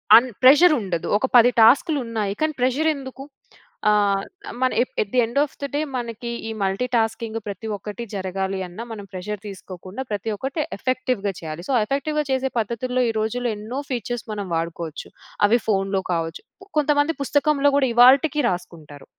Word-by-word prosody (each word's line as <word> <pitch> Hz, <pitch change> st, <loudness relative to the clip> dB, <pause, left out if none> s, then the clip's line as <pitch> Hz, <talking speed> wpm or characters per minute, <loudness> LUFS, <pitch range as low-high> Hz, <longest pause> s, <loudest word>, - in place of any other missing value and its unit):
And 245 Hz, +3 st, +6 dB
pressure 300 Hz, +6 st, +8 dB
ఉండదు. 180 Hz, -5 st, -3 dB
ఒక 235 Hz, -, 0 dB
10 240 Hz, +1 st, +7 dB
టాస్క్‌లు 270 Hz, +7 st, +5 dB
ఉన్నాయి. 215 Hz, -4 st, -2 dB
కానీ 310 Hz, 0 st, +1 dB
ప్రెషర్ 265 Hz, +6 st, +2 dB
ఎందుకు? 270 Hz, -1 st, -8 dB, 0.7 s
ఆహ్, 200 Hz, -2 st, +2 dB, 0.4 s
మన 255 Hz, 0 st, +3 dB
ఏ -, -, +5 dB, 0.2 s
at 200 Hz, -, -4 dB, 0.2 s
the -, -, +4 dB
of -, -, -24 dB
the -, -, -1 dB
day 295 Hz, -, +1 dB, 0.2 s
మనకి 235 Hz, 0 st, -5 dB, 0.2 s
ఈ -, -, -4 dB
మల్టీటాస్కింగ్ 225 Hz, +2 st, -1 dB
ప్రతి 200 Hz, +2 st, -6 dB
ఒక్కటి 210 Hz, +4 st, -7 dB
జరగాలి 190 Hz, 0 st, -3 dB
అన్నా 180 Hz, +6 st, -8 dB
మనం 205 Hz, -3 st, -7 dB
ప్రెషర్ 195 Hz, +2 st, -5 dB
తీసుకోకుండా 185 Hz, +2 st, -8 dB
ప్రతి 205 Hz, +2 st, -2 dB
ఒక్కటి 270 Hz, +9 st, -4 dB, 0.2 s
ఎఫెక్టివ్‌గా 250 Hz, -4 st, -1 dB
చేయాలి. 160 Hz, +1 st, -7 dB
సో, -, -, +1 dB
ఎఫెక్టివ్‌గా 300 Hz, +5 st, -1 dB
చేసే 265 Hz, 0 st, 0 dB
పద్ధతుల్లో 250 Hz, +3 st, -1 dB
ఈ -, -, +1 dB
రోజుల్లో 235 Hz, +2 st, -1 dB
ఎన్నో 220 Hz, +6 st, -5 dB
ఫీచర్స్ 240 Hz, -1 st, -3 dB
మనం 205 Hz, -2 st, -4 dB
వాడుకోవచ్చు. 165 Hz, -1 st, -4 dB, 0.4 s
అవి 235 Hz, +4 st, +3 dB
ఫోన్‌లో 195 Hz, -2 st, +1 dB
కావచ్చు. 165 Hz, -1 st, -3 dB, 0.4 s
కొంతమంది 295 Hz, +2 st, +2 dB
పుస్తకంలో 285 Hz, 0 st, +2 dB
కూడా 270 Hz, -2 st, +3 dB
ఇవాల్టికీ 270 Hz, +5 st, +6 dB
రాసుకుంటారు. 170 Hz, -5 st, -7 dB
225 Hz, 155 wpm, -22 LUFS, 195-260 Hz, 0.7 s, ప్రెషర్